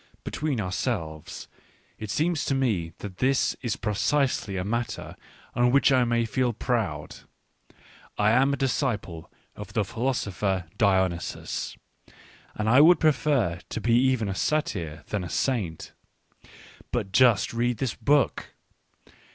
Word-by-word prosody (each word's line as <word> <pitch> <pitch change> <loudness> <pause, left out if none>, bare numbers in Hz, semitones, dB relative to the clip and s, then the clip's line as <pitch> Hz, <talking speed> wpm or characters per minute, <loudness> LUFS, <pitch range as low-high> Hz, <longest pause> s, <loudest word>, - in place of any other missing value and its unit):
Between 150 -5 -2
ourselves, 90 -5 -3 0.5
it 110 - -6
seems 160 - 0
to 135 - 0
me 105 -11 0
that 95 -3 -8
this 135 +1 +2
is 120 -5 -1
precisely 110 -1 0
a 90 - -1
matter 115 +3 -3 0.4
on 120 0 +3
which 140 +1 +4
I 130 -2 +4
may 115 0 +1
feel 125 +1 0
proud. 105 - -2 0.5
J - - -26 0.6
am 135 +3 +4
a 140 - -1
d 135 - +1
is 130 - +1
ciple 100 - -3 0.3
ofthe 105 +1 -3
philo 125 +7 -1
sopher 95 -5 -2
Dionysus, 95 -5 0 0.8
and 105 - -2
I 125 +5 +6
would 175 +3 +7
i - - +8
^prefer~tol>e 115 - -1
even 125 -2 +3
a 95 - -2
satyr 90 - -2
than 100 -3 -2
a 85 - -6
saint. 105 - -2 1.0
But 105 -6 -2
just 120 -3 +4
read 120 0 0
this 130 0 -1
book 145 -3 +1
115 Hz, 135 wpm, -26 LUFS, 95-130 Hz, 1.0 s, i